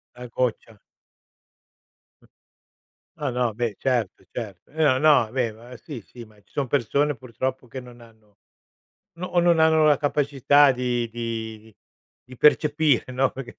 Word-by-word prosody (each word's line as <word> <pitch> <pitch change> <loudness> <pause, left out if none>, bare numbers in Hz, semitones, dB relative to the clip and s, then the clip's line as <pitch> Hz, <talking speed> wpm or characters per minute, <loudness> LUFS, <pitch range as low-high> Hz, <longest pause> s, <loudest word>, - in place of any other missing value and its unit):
La 125 0 -9
goccia. 115 -2 -3 1.4
Mh. - - -23 0.9
No, 150 -3 -3
no, 125 -2 -1
beh 115 -1 -2
certo, 120 -7 -1
certo. 105 -2 -8
No, 150 -4 +2
no, 145 -6 +4
beh 125 -3 0
ma 120 +3 -13
sì, 135 -2 -9
sì, 115 +5 -13
ma 110 -1 -21
ci 100 - -34
son 140 -2 -2
persone 140 +3 +1
purtroppo 130 +2 -5
che 130 +3 -7
non 125 -1 -13
hanno 110 -3 -21 0.8
no 180 - -4
o 175 - +1
non 170 -1 +3
hanno 160 -1 +4
la 150 - +5
capacità 145 -1 +3
di 125 -2 -1
di 110 -2 -6 0.5
di 130 0 -13
percepire 150 -3 +3
no, 135 +1 +1
perché 130 -3 -9
125 Hz, 150 wpm, -24 LUFS, 115-145 Hz, 1.4 s, la